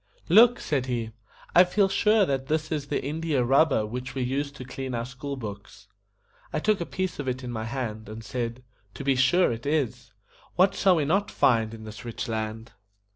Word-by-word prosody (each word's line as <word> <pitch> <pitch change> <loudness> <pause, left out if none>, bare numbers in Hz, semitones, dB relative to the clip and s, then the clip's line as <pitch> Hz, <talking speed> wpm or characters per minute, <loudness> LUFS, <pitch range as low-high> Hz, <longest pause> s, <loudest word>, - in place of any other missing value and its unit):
"Look," 230 +7 +7
said 135 -4 -1
he, 115 -3 -2 0.4
"I 180 - +8
feel 195 +2 +2
sure 210 +1 +3
that 135 -3 -2
this 155 +1 -1
is 145 -3 -2
the - - -2
IN 155 +3 -3
DI 165 -2 -2
A 125 - +3
RUB 135 +6 +4
BER 110 -6 +1
which 125 +4 -6
we 130 - -1
used 140 +3 -2
to 130 - -8
clean 130 0 -5
our 115 0 -2
school 135 +3 -6
books." 100 -3 -9 0.6
I - - -2
took 205 +3 +1
a 170 - -3
piece 185 -3 -3
of 145 - -4
it 130 0 -2
in 125 - -5
my 110 -1 -4
hand, 110 -4 -4
and 110 +1 -8
said, 120 +2 -4 0.3
"To - - -6
be 135 -1 +2
sure 135 +8 +4
it 115 +4 -5
is. 125 -5 -1 0.4
What 185 +2 +4
shall 190 -2 +4
we 155 -3 +1
not 195 +7 +1
find 115 -3 +2
in 115 -1 -9
this 110 -1 -9
rich 120 +1 -5
land?" 110 0 -4
130 Hz, 220 wpm, -26 LUFS, 115-155 Hz, 0.6 s, I